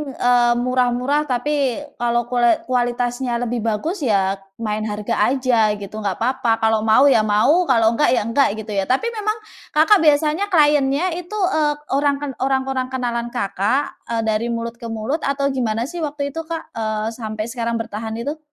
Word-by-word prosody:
eee, 245 Hz, -1 st, +3 dB
murah-murah 255 Hz, +4 st, +1 dB
tapi 275 Hz, 0 st, 0 dB, 0.2 s
kalau 240 Hz, 0 st, +1 dB
kule 240 Hz, -2 st, +3 dB
kualitasnya 245 Hz, 0 st, -1 dB
lebih 240 Hz, 0 st, -2 dB
bagus 310 Hz, -, -2 dB
ya 195 Hz, -7 st, +1 dB, 0.2 s
main 215 Hz, -1 st, -3 dB
harga 210 Hz, +2 st, -4 dB, 0.2 s
aja 235 Hz, -5 st, +2 dB
gitu. 205 Hz, +1 st, -8 dB
Nggak 200 Hz, +1 st, -2 dB
papa 250 Hz, -2 st, +1 dB
kalau 220 Hz, 0 st, +3 dB
mau 220 Hz, +4 st, +4 dB
ya -, -, +5 dB
mau, 215 Hz, +12 st, +3 dB
kalau 225 Hz, -4 st, +4 dB
nggak -, -, +4 dB
ya -, -, +1 dB
nggak, 255 Hz, +5 st, +2 dB, 0.2 s
gitu 210 Hz, -, -8 dB
ya. 195 Hz, -1 st, 0 dB
Tapi 365 Hz, -, +1 dB
memang 430 Hz, -1 st, -2 dB, 0.4 s
Kakak 325 Hz, +7 st, +6 dB
biasanya 305 Hz, +5 st, +3 dB
client-nya 295 Hz, -1 st, +3 dB
itu, 360 Hz, +4 st, -8 dB, 0.2 s
eee, 300 Hz, -1 st, +2 dB, 0.2 s
orang 280 Hz, +1 st, +2 dB
ken 290 Hz, -, -3 dB
orang-orang 265 Hz, -1 st, 0 dB
kenalan 240 Hz, -2 st, -2 dB
Kakak, 225 Hz, +3 st, 0 dB, 0.2 s
eee, 230 Hz, -1 st, -1 dB
dari 220 Hz, +1 st, 0 dB
mulut 235 Hz, 0 st, -4 dB
ke 235 Hz, -, -7 dB
mulut 225 Hz, +7 st, -2 dB
atau 280 Hz, 0 st, 0 dB
gimana 230 Hz, -4 st, -1 dB
sih 335 Hz, +7 st, -6 dB
waktu 290 Hz, -2 st, -3 dB
itu, 325 Hz, +3 st, -5 dB
Kak, 330 Hz, -1 st, -6 dB
eee, 215 Hz, -1 st, -2 dB
sampai 215 Hz, -2 st, -5 dB
sekarang 235 Hz, -1 st, -2 dB
bertahan 220 Hz, 0 st, -4 dB
itu? 285 Hz, +7 st, -4 dB
245 Hz, 170 wpm, -20 LUFS, 225-285 Hz, 0.4 s, Kakak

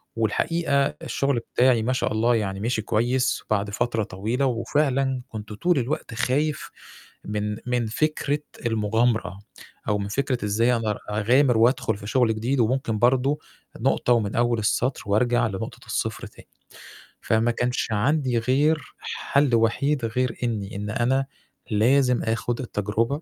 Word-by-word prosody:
والحقيقة 140 Hz, -, +1 dB, 0.2 s
الشُّغل 140 Hz, -3 st, 0 dB
بتاعي 125 Hz, -1 st, +2 dB
ما 125 Hz, +3 st, +1 dB
شاء 130 Hz, -, -1 dB
الله 115 Hz, +3 st, +2 dB
يعني 100 Hz, -3 st, -2 dB
مِشِي 115 Hz, +1 st, -1 dB
كويس 120 Hz, +4 st, 0 dB
بعد 100 Hz, -1 st, 0 dB
فترة 115 Hz, +1 st, -1 dB
طويلة 110 Hz, +9 st, -2 dB
وفعلًا 135 Hz, +1 st, 0 dB
كنت 110 Hz, -1 st, -7 dB
طول 170 Hz, +8 st, +1 dB
الوقت 130 Hz, 0 st, -3 dB
خايف 140 Hz, +6 st, -1 dB, 0.5 s
من 105 Hz, 0 st, -2 dB
من 120 Hz, -2 st, 0 dB
فكرة 145 Hz, +4 st, 0 dB, 0.3 s
المُغامرة 110 Hz, -1 st, 0 dB, 0.5 s
أو 105 Hz, -, +2 dB
من 100 Hz, -, -3 dB
فكرة 125 Hz, +1 st, -1 dB
إزاي 115 Hz, +4 st, +2 dB
أقدر 110 Hz, -2 st, -2 dB
أغامِر 120 Hz, +4 st, +3 dB
وأدخُل 115 Hz, -2 st, +2 dB
في 100 Hz, -, -9 dB
شُغل 115 Hz, -1 st, +2 dB
جديد 125 Hz, +5 st, -1 dB
وممكن 115 Hz, -2 st, 0 dB
برضه 135 Hz, +4 st, +2 dB, 0.4 s
نقطة 125 Hz, -, +2 dB
ومن 105 Hz, -3 st, 0 dB
أول 120 Hz, -1 st, +2 dB
السطر 120 Hz, +5 st, 0 dB
وأرجع 120 Hz, +4 st, +2 dB
لنقطة 95 Hz, -3 st, -6 dB
الصفر -, -, -3 dB
تاني. -, -, -17 dB, 0.7 s
فما 115 Hz, +1 st, +1 dB
كانش 120 Hz, +1 st, -1 dB
عندي 125 Hz, +3 st, +1 dB
غير 145 Hz, +6 st, +1 dB
حَل 140 Hz, -3 st, 0 dB
وحيد 115 Hz, +4 st, +1 dB
غير 115 Hz, +1 st, -1 dB
إنّي 105 Hz, -4 st, -3 dB
إن 105 Hz, +1 st, -4 dB
أنا 130 Hz, +4 st, +1 dB, 0.4 s
لازم 125 Hz, +4 st, +3 dB
آخُد 115 Hz, +2 st, -1 dB
التجربة. 110 Hz, -2 st, -1 dB
120 Hz, 140 wpm, -24 LUFS, 110-130 Hz, 0.7 s, أغامِر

